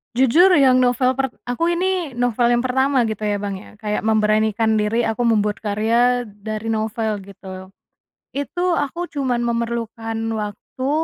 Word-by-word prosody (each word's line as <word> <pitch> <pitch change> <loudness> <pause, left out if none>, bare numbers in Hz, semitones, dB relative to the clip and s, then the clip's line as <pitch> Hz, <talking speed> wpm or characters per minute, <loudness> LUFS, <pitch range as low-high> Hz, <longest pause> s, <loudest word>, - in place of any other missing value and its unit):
Jujur 285 +10 +5
yang 260 -2 +5
novel 250 +1 +2
per 265 -1 -1 0.2
aku 330 +8 0
ini 360 -2 -1
novel 240 0 +2
yang 240 - +3
pertama 260 0 +1
gitu 215 -1 -4
ya 205 -1 0
Bang 200 -1 -3
ya 205 +2 -13
kayak 210 -1 -2
memberanikan 220 0 +2
diri 220 +2 +1
aku 225 +2 -1
membuat 210 -3 +1
karya 235 +4 +1
dari 215 +2 -6
novel 220 -1 -2
gitu. 190 -1 -10 0.6
Itu 350 +6 -1
aku 335 +5 -2
cuman 255 -4 0
memerlukan 230 -1 -3 0.2
waktu 215 +5 -5
230 Hz, 145 wpm, -21 LUFS, 215-255 Hz, 0.6 s, Jujur